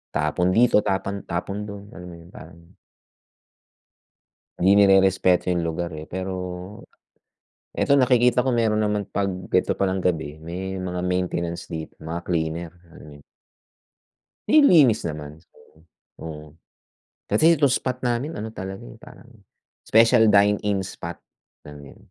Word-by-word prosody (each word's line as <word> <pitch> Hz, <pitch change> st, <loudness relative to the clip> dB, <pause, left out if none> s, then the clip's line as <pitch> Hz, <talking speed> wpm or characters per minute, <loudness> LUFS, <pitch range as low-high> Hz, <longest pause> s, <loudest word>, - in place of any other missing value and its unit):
Tapon 75 Hz, +4 st, 0 dB
dito, 115 Hz, +2 st, +4 dB
tapon 95 Hz, +1 st, -2 dB
tapon 90 Hz, +4 st, -4 dB
doon. 100 Hz, -1 st, -9 dB
Alam 90 Hz, +1 st, -11 dB
mo 85 Hz, -, -10 dB
'yun, 85 Hz, +2 st, -16 dB
parang 85 Hz, +1 st, -14 dB, 1.9 s
'Di 95 Hz, +2 st, +4 dB
nirerespeto 95 Hz, -2 st, +4 dB
'yung 90 Hz, -1 st, 0 dB
lugar 85 Hz, +1 st, -3 dB
eh, 80 Hz, +1 st, -8 dB
pero, 95 Hz, +1 st, -6 dB, 0.9 s
eto 140 Hz, -, +2 dB
nakikita 125 Hz, -1 st, +3 dB
ko, 130 Hz, -, +1 dB
meron 110 Hz, -2 st, +1 dB
naman 105 Hz, -1 st, -2 dB
'pag 100 Hz, -1 st, -1 dB, 0.2 s
eto 90 Hz, -, +2 dB
palang 95 Hz, -1 st, 0 dB
gabi, 80 Hz, -4 st, -1 dB
may 95 Hz, +3 st, -5 dB
mga 90 Hz, -1 st, -4 dB
maintenance 90 Hz, -2 st, -2 dB
dito, 80 Hz, -2 st, -7 dB
mga 80 Hz, +2 st, -5 dB
cleaner. 85 Hz, 0 st, -2 dB, 0.2 s
Alam -, -, -14 dB
mo -, -, -12 dB
'yun. 70 Hz, -, -20 dB, 1.2 s
Nililinis 160 Hz, -, +5 dB
naman 75 Hz, -1 st, -7 dB
so, 80 Hz, -1 st, -25 dB, 0.4 s
oo. 75 Hz, -1 st, -8 dB, 0.8 s
Kasi 165 Hz, +2 st, +5 dB
itong 145 Hz, -3 st, +2 dB
spot 125 Hz, 0 st, -2 dB
namin 125 Hz, +6 st, -2 dB
ano 110 Hz, +1 st, -6 dB
talaga 95 Hz, -2 st, -7 dB
eh, -, -, -12 dB
parang -, -, -16 dB, 0.6 s
special 115 Hz, +1 st, +5 dB
dine-in 105 Hz, 0 st, +2 dB
spot 85 Hz, -2 st, -8 dB, 0.4 s
namin. 70 Hz, -1 st, -12 dB
95 Hz, 135 wpm, -23 LUFS, 85-105 Hz, 1.9 s, Nililinis